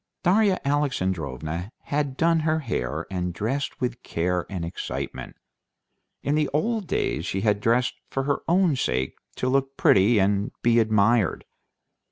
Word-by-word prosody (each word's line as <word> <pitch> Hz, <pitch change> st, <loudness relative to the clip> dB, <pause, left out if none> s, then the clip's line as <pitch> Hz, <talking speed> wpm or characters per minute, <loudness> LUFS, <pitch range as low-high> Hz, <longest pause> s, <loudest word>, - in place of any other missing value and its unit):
Darya 195 Hz, +1 st, +3 dB
Alexandrovna 95 Hz, -, -1 dB
had 145 Hz, -2 st, -2 dB
done 165 Hz, 0 st, +3 dB
her 155 Hz, 0 st, +1 dB
hair, 80 Hz, -, -3 dB
and 90 Hz, -2 st, -2 dB
dressed 130 Hz, +9 st, -2 dB
with 125 Hz, -1 st, -2 dB
care 90 Hz, +1 st, -1 dB
and 90 Hz, -4 st, -4 dB
excitement. 85 Hz, -, -5 dB, 0.9 s
In 145 Hz, -, 0 dB
the 150 Hz, -1 st, +1 dB
old 205 Hz, -, 0 dB
days -, -, -1 dB
she 95 Hz, -, -2 dB
had 105 Hz, -1 st, +1 dB
dressed 120 Hz, +3 st, +2 dB, 0.2 s
for 135 Hz, -, -2 dB
her 145 Hz, +1 st, 0 dB
own 175 Hz, -3 st, +3 dB
sake 65 Hz, -, -1 dB, 0.2 s
to 125 Hz, -, -2 dB
look 135 Hz, +1 st, 0 dB
pretty 105 Hz, +4 st, +5 dB
and 100 Hz, +1 st, +1 dB
be 120 Hz, 0 st, +4 dB
admired. 110 Hz, -1 st, +2 dB
120 Hz, 145 wpm, -25 LUFS, 95-145 Hz, 0.9 s, pretty